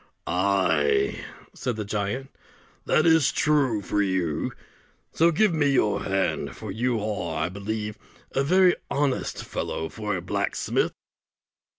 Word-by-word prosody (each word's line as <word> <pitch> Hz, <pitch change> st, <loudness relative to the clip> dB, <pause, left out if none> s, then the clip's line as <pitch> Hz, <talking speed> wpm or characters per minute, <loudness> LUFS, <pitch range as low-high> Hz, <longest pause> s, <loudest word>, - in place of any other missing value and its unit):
"Ay," 80 Hz, -7 st, +2 dB, 0.3 s
said 125 Hz, -, -3 dB
the 105 Hz, -1 st, -4 dB
giant, 105 Hz, +7 st, -3 dB, 0.6 s
"that 155 Hz, -, +3 dB
is 160 Hz, -4 st, +5 dB
true 135 Hz, -9 st, +2 dB
for 105 Hz, +2 st, 0 dB
you; 95 Hz, -6 st, 0 dB, 0.6 s
so 165 Hz, +1 st, +4 dB
give 180 Hz, +3 st, +3 dB
me 145 Hz, -3 st, +2 dB
your 115 Hz, -6 st, +2 dB
hand; 95 Hz, 0 st, -1 dB
for -, -, -7 dB
you 120 Hz, +3 st, 0 dB
are, 100 Hz, -6 st, -3 dB
I -, -, -1 dB
believe, 105 Hz, +2 st, -4 dB, 0.3 s
a 135 Hz, -, +1 dB
very 180 Hz, +4 st, +5 dB
honest 140 Hz, -2 st, -1 dB
fellow 80 Hz, -, -3 dB
for 105 Hz, 0 st, -3 dB
a 90 Hz, -, -3 dB
blacksmith." -, -, -1 dB
105 Hz, 130 wpm, -25 LUFS, 95-140 Hz, 0.6 s, is